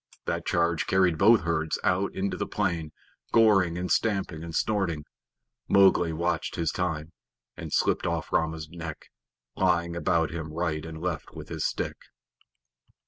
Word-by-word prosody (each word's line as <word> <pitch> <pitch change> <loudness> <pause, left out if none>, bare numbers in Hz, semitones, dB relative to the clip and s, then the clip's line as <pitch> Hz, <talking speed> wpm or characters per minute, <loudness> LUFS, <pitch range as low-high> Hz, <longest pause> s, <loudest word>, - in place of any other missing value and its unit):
That 85 0 -2
charge 85 -2 +1
carried 95 -4 +3
both 110 +3 +6
herds 80 -2 -1
out 95 +2 +1
into 95 +1 -1
the - - -3
plain, 85 -7 -1 0.4
goring 100 -7 +4
and 90 0 -3
stamping 95 -7 0
and 85 -1 -6
snorting. 90 -9 0 0.6
Mowgli 95 -4 +5
watched 85 +2 -1
his 85 -2 0
time, 80 -3 -2 0.4
and 80 -3 -7
slipped - - +1
off - - -2
Rama's 80 -1 0
neck, 85 -1 -8 0.4
laying 85 -2 +1
about 85 0 +1
him 80 -2 -5
right 80 -2 -1
and 80 -1 -7
left 85 -4 -4
with - - -9
his - - -1
stick. - - -3
85 Hz, 145 wpm, -27 LUFS, 80-95 Hz, 0.6 s, both